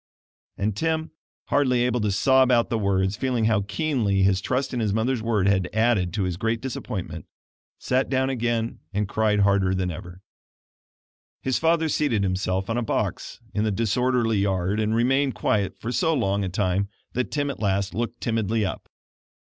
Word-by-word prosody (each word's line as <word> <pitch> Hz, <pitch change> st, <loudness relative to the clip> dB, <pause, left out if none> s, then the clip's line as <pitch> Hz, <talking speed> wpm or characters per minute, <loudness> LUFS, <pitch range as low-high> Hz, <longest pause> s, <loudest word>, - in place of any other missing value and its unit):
And 100 Hz, 0 st, -1 dB
Tim, 160 Hz, +4 st, -1 dB, 0.4 s
hardly 130 Hz, -4 st, +2 dB
able 125 Hz, -1 st, 0 dB
to 105 Hz, -1 st, +1 dB
sob 130 Hz, +6 st, +4 dB
out 120 Hz, -2 st, +3 dB
the 115 Hz, -, +1 dB
words, 95 Hz, -1 st, +1 dB
feeling 125 Hz, -2 st, 0 dB
how 110 Hz, -2 st, +3 dB
keenly 100 Hz, -2 st, 0 dB
his 95 Hz, 0 st, +3 dB
trust 130 Hz, +5 st, -1 dB
in 125 Hz, -, -1 dB, 0.2 s
mother's 120 Hz, +2 st, 0 dB
word 110 Hz, -4 st, +1 dB
had 95 Hz, -2 st, +2 dB
added 110 Hz, -6 st, +2 dB
to 105 Hz, -, 0 dB
his 90 Hz, -2 st, -2 dB
great 115 Hz, +3 st, -1 dB
disappointment, 95 Hz, -, -5 dB, 0.5 s
sat 130 Hz, +1 st, 0 dB
down 130 Hz, 0 st, +1 dB
again, 120 Hz, -2 st, -1 dB, 0.2 s
and 105 Hz, 0 st, 0 dB
cried 105 Hz, 0 st, +1 dB
harder 100 Hz, -2 st, +3 dB
than 90 Hz, -1 st, -1 dB
ever. 90 Hz, +2 st, -9 dB, 1.2 s
His 130 Hz, -1 st, 0 dB
father 165 Hz, 0 st, +2 dB
seated 140 Hz, -9 st, +1 dB
himself 95 Hz, 0 st, -1 dB
on 115 Hz, +1 st, -1 dB
a -, -, -1 dB
box 115 Hz, -, -3 dB
in 105 Hz, -, 0 dB
the 110 Hz, -, +1 dB
disorderly 115 Hz, +1 st, +1 dB
yard 95 Hz, +1 st, 0 dB
and 110 Hz, +1 st, +1 dB
remained 135 Hz, +2 st, +2 dB
quiet 105 Hz, -2 st, 0 dB
for 115 Hz, -, -4 dB
so 160 Hz, +4 st, +1 dB
long 100 Hz, -5 st, 0 dB
a 95 Hz, -, -2 dB
time 95 Hz, +1 st, 0 dB, 0.2 s
that 125 Hz, 0 st, -1 dB
Tim 145 Hz, -1 st, -1 dB
at -, -, -9 dB
last 100 Hz, -1 st, 0 dB
looked 120 Hz, +1 st, -3 dB
timidly 110 Hz, -1 st, 0 dB
up. 95 Hz, -, -5 dB
110 Hz, 175 wpm, -24 LUFS, 100-125 Hz, 1.2 s, sob